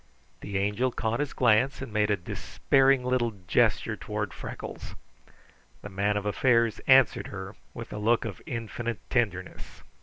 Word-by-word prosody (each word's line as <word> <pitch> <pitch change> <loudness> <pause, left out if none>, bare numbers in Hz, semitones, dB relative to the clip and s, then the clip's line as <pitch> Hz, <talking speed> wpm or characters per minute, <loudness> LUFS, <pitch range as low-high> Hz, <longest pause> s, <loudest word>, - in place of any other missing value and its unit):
The 100 -1 -4
Angel 105 +6 +1
caught 115 0 -2
his 145 -1 -1
glance 125 +2 +3
and 130 -5 -7
made 105 -1 +2
a 105 - +2
despairing 135 +8 +1
little 125 -2 +1
gesture - - +2
toward - - -4
Freckles. - - -8 0.9
The - - -7
Man 100 +2 0
of 105 - -3
Affairs 115 +1 +2
answered 130 -3 +5
her 95 +1 -7 0.2
with 115 - -7
a 105 - -4
look 115 +3 +2
of 105 -4 -6
infinite 115 -3 -4
tenderness. 95 -7 -2
115 Hz, 150 wpm, -27 LUFS, 105-125 Hz, 0.9 s, answered